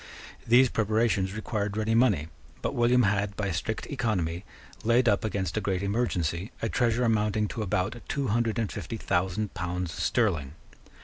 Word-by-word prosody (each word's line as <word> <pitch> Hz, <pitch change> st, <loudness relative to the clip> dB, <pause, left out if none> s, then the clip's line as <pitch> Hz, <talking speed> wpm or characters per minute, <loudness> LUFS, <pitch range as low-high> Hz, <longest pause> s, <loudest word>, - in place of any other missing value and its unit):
These 125 Hz, +2 st, +6 dB
preparations 110 Hz, -3 st, +1 dB
required 105 Hz, -1 st, -2 dB
ready 110 Hz, +1 st, +1 dB
money: 110 Hz, -, +3 dB, 0.4 s
but -, -, -1 dB
William 120 Hz, +1 st, +4 dB
had, 100 Hz, 0 st, +1 dB
by 100 Hz, -2 st, -1 dB
strict 100 Hz, +5 st, -3 dB
economy, 95 Hz, -, -1 dB, 0.4 s
laid 120 Hz, +2 st, +3 dB
up 100 Hz, -, +3 dB
against 100 Hz, -2 st, -2 dB
a -, -, +1 dB
great 95 Hz, -2 st, -1 dB
emergency 100 Hz, -4 st, -1 dB
a 115 Hz, -, -1 dB
treasure 120 Hz, 0 st, +1 dB
amounting 105 Hz, -2 st, +1 dB
to 115 Hz, -, -4 dB
about 100 Hz, +3 st, -1 dB
two 140 Hz, -2 st, -1 dB
hundred 115 Hz, +1 st, +1 dB
and 115 Hz, -4 st, -1 dB
fifty 100 Hz, +3 st, -5 dB
thousand 95 Hz, +2 st, -1 dB
pounds 90 Hz, -1 st, -3 dB
sterling. 85 Hz, -, 0 dB
105 Hz, 160 wpm, -28 LUFS, 95-115 Hz, 0.4 s, These